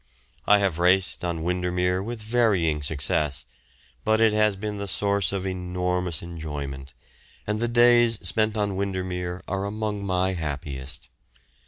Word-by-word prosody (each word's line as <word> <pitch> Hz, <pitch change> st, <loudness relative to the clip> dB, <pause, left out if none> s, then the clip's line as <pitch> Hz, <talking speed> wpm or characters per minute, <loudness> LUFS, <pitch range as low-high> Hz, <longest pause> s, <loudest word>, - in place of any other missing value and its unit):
I 105 Hz, -, +7 dB
have 95 Hz, -5 st, 0 dB
raced 90 Hz, +2 st, +3 dB
on 85 Hz, -2 st, -2 dB
Windermere 90 Hz, +1 st, 0 dB
with 110 Hz, +1 st, -6 dB
varying 105 Hz, -10 st, +1 dB
success, 75 Hz, -1 st, +1 dB, 0.6 s
but 110 Hz, 0 st, +2 dB
it 110 Hz, -1 st, +4 dB
has 105 Hz, -1 st, +3 dB
been 105 Hz, +1 st, -5 dB
the 100 Hz, -, -4 dB
source 100 Hz, +2 st, +2 dB
of 95 Hz, -1 st, -3 dB
enormous 90 Hz, -2 st, -2 dB
enjoyment, 75 Hz, -5 st, -7 dB, 0.5 s
and 105 Hz, 0 st, -1 dB
the 120 Hz, -, 0 dB
days 120 Hz, -1 st, +5 dB
spent 110 Hz, +3 st, +1 dB
on 100 Hz, -2 st, -1 dB
Windermere 95 Hz, -2 st, -3 dB
are 95 Hz, +1 st, -2 dB
among 105 Hz, 0 st, -3 dB
my 95 Hz, -1 st, 0 dB
happiest. 70 Hz, -4 st, -6 dB
95 Hz, 140 wpm, -25 LUFS, 85-105 Hz, 0.6 s, I